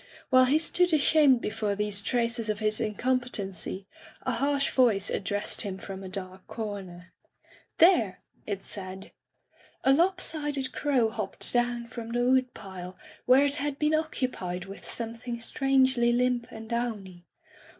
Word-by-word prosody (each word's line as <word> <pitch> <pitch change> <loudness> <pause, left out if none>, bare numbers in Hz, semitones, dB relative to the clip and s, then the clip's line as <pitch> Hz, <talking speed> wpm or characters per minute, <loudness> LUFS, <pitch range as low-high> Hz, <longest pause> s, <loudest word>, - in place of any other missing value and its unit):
While 255 0 +6
he 275 +4 +3
stood 350 +2 +3
ashamed 285 -4 +4
before 210 -1 -2
these 205 0 0
traces 230 0 0
of 210 - 0
his 215 +1 0
incompetency, 210 -5 -2 0.4
a - - -1
harsh 280 0 0
voice 220 -7 +2
addressed 205 +1 0
him 195 -3 -4
from 195 0 -8
a 190 - -8
dark 185 -1 -7
comer. 190 -5 -7 0.6
"There!" 285 - +4 0.3
it 200 -2 -4
said. 190 -1 -5 0.7
A 265 - +4
lop 360 +6 +3
sided 290 -6 -1
crow 255 -7 +1
hopped 215 -3 -1
down 240 -1 0
from 230 0 -8
the 245 0 +1
wood 255 -1 +2
pile, 185 -2 -9 0.3
where 260 +3 +6
it 285 0 +2
had 285 -1 -2
been 300 +1 +1
occupied 250 - -2
with 195 +1 -10
something 235 +1 -3
strangely 260 0 +2
limp 245 0 +1
and 220 0 -9
downy. 210 -7 -4
235 Hz, 145 wpm, -27 LUFS, 200-260 Hz, 0.7 s, While